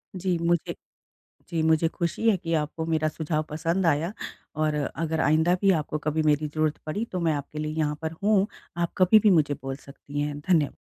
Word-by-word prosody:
जी 180 -1 0
मुझे 170 0 0 0.7
जी 165 -2 -1
मुझे 160 0 +3
खुशी 170 +7 0
है 215 - +4
कि 165 -1 -4
आपको 160 +1 -1
मेरा 160 -1 +1
सुझाव 155 0 -2
पसंद 165 +4 -1
आया 165 +4 +1 0.4
और 155 0 +1
अगर 160 +2 -2
आइंदा 160 +4 +3
भी 195 -1 +5
आपको 155 -3 -1
कभी 155 +1 -1
मेरी 150 0 +2
ज़रूरत 155 0 -1
पड़ी, 180 +9 -2
तो 185 -5 -4
मैं 165 -2 +1
आपके 145 +1 -5
लिए 155 0 -3
यहाँ 150 -1 0
पर 160 0 -2
हूँ। 205 -1 +3 0.3
आप 170 0 -1
कभी 185 +4 +6
भी 210 - +4
मुझे 155 -6 +3
बोल 135 0 -4
सकती 140 +1 -8
हैं। 145 0 -3
धन्य 155 -2 +1
160 Hz, 200 wpm, -26 LUFS, 150-170 Hz, 0.7 s, कभी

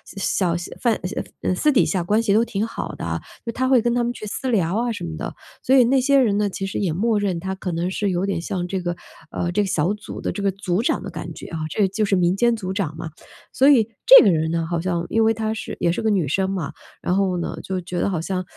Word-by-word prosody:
小 185 -3 0
小 175 - -7
贩 235 -3 +2
小 - - -3
呃 - - -11 0.2
呃， 185 - +1
私 300 +11 +3
底 260 - +4
下 185 -3 0
关 210 +6 +2
系 205 -3 +2
都 220 +3 +4
挺 210 -2 -2
好 225 - -5
的， - - -4 0.2
就 230 - -2
她 260 +3 -1
会 260 -2 +6
跟 240 0 +1
他 245 0 +1
们 240 - 0
去 240 - -8
私 255 +5 -3
聊 190 -6 +1
啊 240 0 0
什 205 -5 -5
么 165 -2 -5
的。 160 - -5 0.3
所 265 - +3
以 260 - +7
那 260 +3 +3
些 280 +2 +4
人 215 -6 +3
呢， 205 -1 +1
其 195 0 -4
实 195 - -3
也 190 -5 0
默 210 +6 +1
认 190 -4 -1
她 190 +2 -3
可 190 -1 -4
能 170 +2 -2
是 200 +1 -1
有 180 +1 0
点 195 -4 -2
像 175 0 -3
这 190 +1 -2
个 175 -1 -2 0.3
呃， 175 - -2
这 210 - +1
个 200 - -1
小 175 +1 +1
组 210 0 -8
的 - - -2
这 205 - -5
个 200 -1 +2
组 190 0 -1
长 240 - 0
的 - - -6
感 - - -6
觉 - - -9
啊， 165 - -5
这 200 +5 +2
就 195 +3 -1
是 200 -1 +2
民 180 0 +2
间 235 +3 +3
组 190 -4 -4
长 170 -6 -3
嘛。 160 0 -6 0.4
所 270 +2 +5
以 235 -7 +5 0.2
这 - - +10
个 200 - +6
人 160 -1 +1
呢， 165 0 -1
好 170 -1 -1
像 175 -1 -1
因 225 - +2
为 225 0 +4
她 220 0 -1
是 220 - -6
也 170 - +2
是 175 - -2
个 220 - +1
女 190 -8 +1
生 190 +7 0
嘛， 180 -7 -3 0.3
然 180 - 0
后 190 -2 +1
呢， 170 - -4
就 190 -1 -3
觉 175 0 -4
得 - - +1
好 175 -5 -2
像， 185 +2 -2
195 Hz, 310 characters per minute, -22 LUFS, 175-220 Hz, 0.4 s, 这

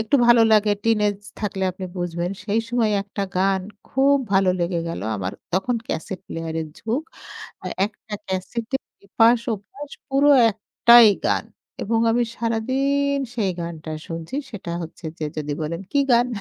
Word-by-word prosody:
একটু 220 +6 +2
ভালো 235 -1 +7
লাগে 210 -1 +4
টিনেজ 210 -3 +2 0.2
থাকলে 195 -2 -3
আপনি 185 +1 -7
বুঝবেন। 175 0 -2
সেই 215 +2 +1
সময় 235 -2 +1
একটা 200 0 -5
গান 190 0 +2 0.3
খুব 275 +2 +4 0.2
ভালো 190 -1 +4
লেগে 170 0 0
গেল। 165 - -4 0.2
আমার 95 -1 -3 0.2
তখন 195 +7 +1
ক্যাসেট 190 - -4
প্লেয়ার 165 -1 -5
এর 155 - -5
যুগ। 235 +7 -2 0.6
আ - - -9 0.2
একটা 210 0 -10
ক্যাসেটের 225 +8 -3 0.3
এপাশ 230 +4 +4 0.2
ওপাশ 265 +9 -11 0.2
পুরো 280 +1 +3 0.2
একটাই 235 +3 +6 0.2
গান - - +1 0.4
এবং 225 +2 +1
আমি 240 +1 +2
সারাদিন 270 +5 0 0.2
সেই 200 -5 +1
গানটা 165 -2 -6 0.2
শুনছি। 165 +8 -6 0.2
সেটা 190 -6 -6
হচ্ছে 165 +1 -10
যে 155 - -2
যদি 150 -1 -2
বলেন 165 +4 -3
কি 285 - +3
গান? 240 +1 +5
210 Hz, 155 wpm, -23 LUFS, 180-240 Hz, 0.6 s, ভালো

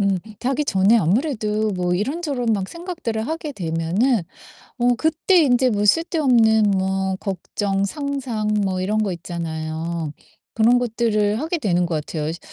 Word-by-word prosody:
음 200 -2 +2 0.2
자기 270 +4 0
전에 195 0 +4
아무래도 215 - 0
뭐 180 -2 -1
이런저런 270 - -2
막 195 -3 -1
생각들을 335 -11 -4
하게 320 -2 -4
되면은 180 +4 0 0.5
어 245 0 +3
그때 320 - +1
인제 255 -2 +3
뭐 205 -2 0
쓸데없는 235 - +3
뭐 190 0 0
걱정, 195 +1 -2
상상 265 -2 -3 0.2
뭐 185 -1 -1
이런 205 +4 0
거 200 -3 -1
있잖아요. 165 -1 -4 0.4
그런 235 +2 +4
것들을 220 -3 0
하게 325 +3 -2
되는 180 - +1
것 170 -2 -2
같아요. 155 -2 -3
이제 165 +2 -4
215 Hz, 295 characters per minute, -21 LUFS, 185-255 Hz, 0.5 s, 전에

